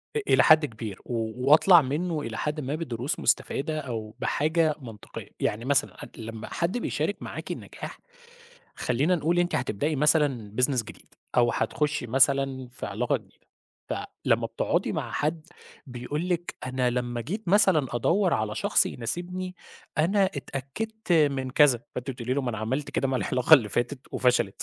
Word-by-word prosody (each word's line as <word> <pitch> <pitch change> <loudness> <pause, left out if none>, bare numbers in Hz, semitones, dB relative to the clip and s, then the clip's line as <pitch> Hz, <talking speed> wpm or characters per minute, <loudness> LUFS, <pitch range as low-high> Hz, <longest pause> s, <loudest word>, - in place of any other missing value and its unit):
إ - - +2
إلى - - +5
حد 155 -1 +6
كبير 110 -5 -7
و 115 -2 -2 0.2
واطلع 170 +2 +8
منّه 155 +4 -2
إلى 115 -3 -5
حدٍ 150 +1 -2
ما 140 +2 -2
بدروس 150 0 -3
مستفادة 155 +2 0
أو 115 -6 -5
بحاجة 155 +1 +1
منطقية. 110 -4 -9
يعني 110 +4 -1
مثلًا 140 -1 +2
عت - - -11
لمّا 115 0 -7
حد 175 +7 -1
بيشارك - - -2
معاكِ - - -6
النجاح، - - -8 0.8
خلّينا 145 +9 +1
نقول 170 +2 +1
أنتِ 175 0 +1
هتبدئي 140 +5 -1
مثلًا 145 -8 +2
business 125 -3 +2
جديد 105 - -14 0.2
أو 120 -1 +4
هتخُشّي 150 -4 -1
مثلًا 135 0 +2
في 125 - -7
علاقة - - 0
جديدة، - - -17 0.4
فلمّا - - -1
بتقعُدي - - -1
مع - - -3
حد 155 +2 -2 0.4
بيقول 135 +7 -4
لِك 175 -1 -2
أنا 130 -1 0
لمّا 120 -1 -2
جيت 185 - -5
مثلًا 190 -8 +4
أدوّر 180 - +2
على 110 0 -1
شخص 110 - +2
يناسبني، 180 +9 -4 0.4
أنا 195 +5 +3
اتأكدت 175 +9 -5
من 140 -5 +2
كذا. 130 -3 +4
فأنتِ 125 +2 -4
بتقولي 125 -1 -4
له 140 - 0
ما 125 - -1
أنا 110 - -5
عملت 130 +7 -2
كده 135 - 0
مع 130 - 0
العلاقة 125 +4 +5
اللي 115 -8 +3
فاتت 120 +4 -2
وفشلت، 125 -6 +1
135 Hz, 160 wpm, -27 LUFS, 120-160 Hz, 0.8 s, واطلع